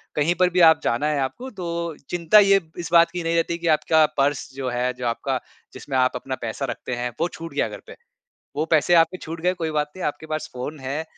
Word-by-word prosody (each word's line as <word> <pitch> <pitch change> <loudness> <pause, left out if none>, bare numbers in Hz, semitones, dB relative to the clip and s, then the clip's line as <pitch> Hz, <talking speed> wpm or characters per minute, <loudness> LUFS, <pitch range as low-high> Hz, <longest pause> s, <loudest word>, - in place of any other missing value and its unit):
कहीं 150 +3 +2
पर 180 +1 +3
भी - - +4
आप 160 - +3
जाना 120 +6 0
है 150 -2 0
आपको 240 - -4
तो 170 -2 -3
चिंता 175 +4 +5
ये 195 -1 +5 0.2
इस 170 - -5
बात 170 0 +6
की 175 -1 -4
नहीं 165 0 0
रहती 170 0 0
कि 170 0 -4
आपका 155 +1 +3
पर्स 140 0 0
जो 135 -2 -3
है 125 +1 0
जो 125 0 -7
आपका 130 +3 -1 0.3
जिसमें 135 -2 -4
आप 130 0 +2
अपना 130 +1 -4
पैसा 115 +4 -3
रखते 125 - -4
हैं 120 0 -3
वो 165 - +2
छूट 165 0 -8
गया - - +1
घर - - -8
पे। - - -10 0.6
वो 155 - 0
पैसे 160 +2 +4
आपके 165 +2 +4
छूट 165 0 -7
गए 180 +2 +2
कोई 165 -3 -3
बात 150 -1 -1
नहीं 185 - -7
आपके 145 +1 -5
पास 155 - -4
फ़ोन 130 +5 -6
है 135 +4 -3
155 Hz, 240 wpm, -23 LUFS, 135-170 Hz, 0.6 s, बात